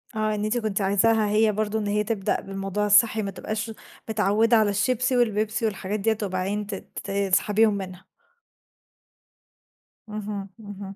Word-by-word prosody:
آه 215 0 0
إن 210 - -3
أنتِ 225 +3 0
كنتِ 215 -3 -1
عايزاها 210 +3 +3
هي 215 +1 +3
برضه 215 +1 -1
إن 210 - -3
هي 210 +1 +1
تبدأ 210 -3 -1
بالموضوع 195 +1 -3
الصحي 215 +1 +5
ما 200 - -3
تبقاش، 215 +3 -4 0.4
متعودة 220 +2 +3
على 215 -1 +3
الشيبسي 250 +5 +1
والبيبسي 220 -1 +1
والحاجات 205 0 -2
ديّة 220 +1 +1
وبعدين 195 +2 -2
ت 205 - -4 0.4
تسحبيهم 200 +2 +2
منها. 185 -1 -8 2.0
اهم، 205 -2 -5
اهم. 200 -2 -9
210 Hz, 140 wpm, -25 LUFS, 200-220 Hz, 2.0 s, الصحي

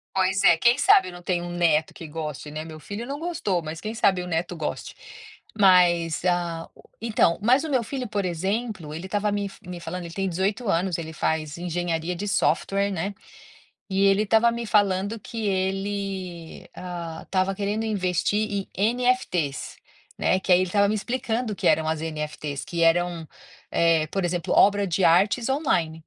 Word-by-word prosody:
Pois 190 0 +2
é, 170 - +6
quem 235 +9 +4
sabe 400 +6 +5
eu - - -10
não 175 - -10
tenho 175 -1 -1
um 175 - -6
neto 165 -3 +2
que 165 - -9
goste, 150 -2 -6
né. 155 +1 -5
Meu 155 -1 -9
filho 205 +8 -6
não 280 +2 -5
gostou. 305 - -1
Mas 160 +1 -6
quem 215 +4 -5
sabe 190 -5 +2
o 180 - -6
neto 175 +1 -2
goste. 155 -2 -5 0.6
Mas, 175 -5 +4
ah 170 -2 -1 0.3
então, 215 -7 +2
mas 250 +7 +4
o 320 - -4
meu 250 -3 +2
filho, 255 +2 -4
por 205 -1 -2
exemplo, 190 -1 -3
ele 170 +4 -6
estava 205 +1 0
me 205 0 -1
f - - -16
me 180 -1 -6
falando, 170 +1 -6
ele 165 - -8
tem 195 +1 -1
18 195 +6 -1
anos, 180 0 +1
ele 160 -1 -6
faz 155 -1 -2
engenharia 175 0 -2
de 205 +4 -4
software, 200 0 +1
né, 195 +2 -3 0.8
e 190 +1 +1
ele 195 +1 +4
estava 225 +2 +4
me 235 0 -4
falando 200 +1 +1
que 225 -1 -5
ele, 190 -3 -3
ah, 170 -3 -6
estava 190 0 0
querendo 205 +3 -2
investir 200 +1 0
em 215 +5 +1
NFTs, 180 - -1 0.4
né. 185 - +2
Que 185 - -5
aí 180 - +7
ele 185 - 0
estava 200 +2 +3
me 215 - +1
explicando 235 0 -2
o - - -18
que - - +1
eram 160 0 +3
as 160 -1 -1
NFTs, 150 -2 -4
que 175 -4 -3
eram, 170 0 +2 0.4
eh, 165 -2 +3
por 195 +2 -2
exemplo, 175 -2 -1
obra 200 0 +5
de 180 +2 +1
artes 200 +9 +3
online. 265 - +1
185 Hz, 185 wpm, -25 LUFS, 170-205 Hz, 0.8 s, aí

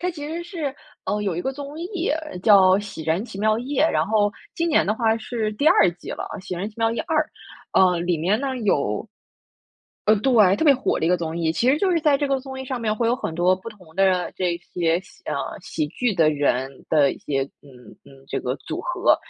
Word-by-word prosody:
它 360 - 0
其 295 -4 -7
实 335 +2 -4
是 325 -6 -4 0.3
呃， 210 - -1
有 195 -5 -1
一 175 - -2
个 265 - -2
综 285 +2 -8
艺 360 0 -2 0.3
叫 205 -3 +7 0.2
《喜 200 -5 -8
人 165 +6 0
奇 195 - -9
妙 215 +1 +2
夜》， 270 +4 0
然 - - +1
后 210 -1 +2 0.2
今 335 0 0
年 310 - +3
的 210 - +2
话 225 -1 +2
是 220 -1 -3
第 285 +9 +3
2 - - +5
季 175 - -10
了， - - -4 0.2
《喜 - - -4
人 190 +4 -3
奇 215 - -18
妙 225 0 +2
夜 230 - -2
2》， 315 -2 +2 0.7
呃， 170 - -2
里 175 0 0
面 190 +8 +1
呢 270 -2 -2
有 145 - 0 1.0
呃， 215 - +6
对， 210 -4 +4
特 320 - 0
别 290 -3 +7
火 265 - 0
的 - - 0
一 - - +3
个 180 - +4
综 165 -1 -4
艺， 165 -1 0
其 240 +9 +2
实 295 - +2
就 395 - +2
是 340 -2 +2
在 300 -3 +3
这 290 - 0
个 270 -1 +1
综 265 0 -8
艺 - - -5
上 255 -1 -4
面 215 -2 0
会 230 +2 0
有 235 - +3
很 255 -10 -4
多 175 +2 +3
不 190 +4 -9
同 180 -7 -17
的 185 -2 +2
这 180 -2 0
些 170 -1 0
喜 - - -20
啊， - - -3 0.3
喜 310 - -3
剧 245 -3 -1
的 165 -3 +4
人 135 -2 -1
的 145 -3 +4
一 - - -11
些 135 -2 -1 0.2
嗯， 145 - -16 0.3
嗯， - - -17 0.2
这 - - -2
个 - - -2
组 - - -6
合， - - +2
215 Hz, 250 characters per minute, -23 LUFS, 175-270 Hz, 1.0 s, 叫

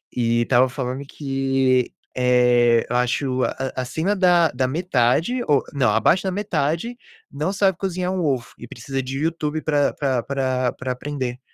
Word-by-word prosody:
E 120 -1 +1
tava 130 0 +3
falando 130 +1 -4
que, 135 -3 0 0.2
eh, 125 -2 +3
eu 125 - -2
acho 130 +1 0
a 130 0 -3
a 130 - -1
acima 160 +10 -1
da 175 -4 +4
da 130 +1 0
metade, 165 - +1
ou 145 -3 +3
não, 135 -6 +2
abaixo 115 - +3
da 190 - -1
metade 200 +3 -2 0.3
não 150 +7 -2
sabe 195 -3 +1
cozinhar 185 -1 -2
um 185 -2 -1
ovo 130 -6 -1
e 120 - -10
precisa 135 +3 -5
de 135 +1 -5
YouTube 155 -1 -2
pra 145 -2 +1
pra 130 -4 -1
pra 130 -2 -1
pra 130 0 -4
aprender. 130 -1 -4
135 Hz, 165 wpm, -22 LUFS, 125-160 Hz, 0.3 s, da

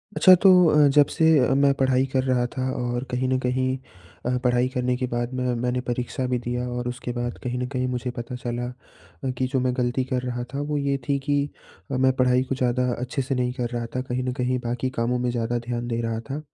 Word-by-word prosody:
अच्छा 185 - +8
तो 195 - +7 0.2
अ, 150 -1 +5
जब 145 +1 +5
से 160 -1 +4
अ, 130 +1 +3
मैं 140 0 +4
पढ़ाई 130 -1 +2
कर 130 -1 +2
रहा 125 -2 +1
था 130 0 0
और 120 0 -2
कहीं 125 +1 0
न 130 - +2
कहीं 130 +1 0 0.5
अ, 125 +1 +1
पढ़ाई 125 0 +3
करने 125 -1 0
के 130 - -1
बाद 120 +1 -2
मैं 125 -1 0
मैंने 125 0 0
परीक्षा 125 +1 -2
भी 125 0 0
दिया 125 +1 -3
और 125 0 -3
उसके 125 0 -5
बाद 120 0 -3
कहीं 125 0 -2
न 125 - -1
कहीं 130 -1 -2
मुझे 125 0 -2
पता 120 +1 -6
चला 120 0 -3 0.6
अ, 135 - -1
कि 130 +1 -1
जो 130 - +3
मैं 125 0 +1
गलती 125 +1 +1
कर 125 -1 +1
रहा 125 -1 -3
था, 140 - -2
वो 145 0 -2
ये 140 -1 0
थी 140 - +2
कि 145 -1 +2 0.5
अ, 130 - 0
मैं 130 0 +4
पढ़ाई 125 -1 +3
को 135 +1 -3
ज़्यादा 125 0 +1
अच्छे 125 +3 -3
से 135 +1 -2
नहीं 125 0 0
कर 120 -2 -3
रहा 120 -1 -3
था। 130 - 0
कहीं 130 0 -3
न 125 - -1
कहीं 125 -1 0
बाकी 120 +2 -1
कामों 120 +1 +1
में 125 0 0
ज़्यादा 120 0 -1
ध्यान 120 0 -2
दे 115 -1 -1
रहा 115 -1 -2
था, 140 +2 -3
125 Hz, 245 wpm, -24 LUFS, 120-130 Hz, 0.6 s, अच्छा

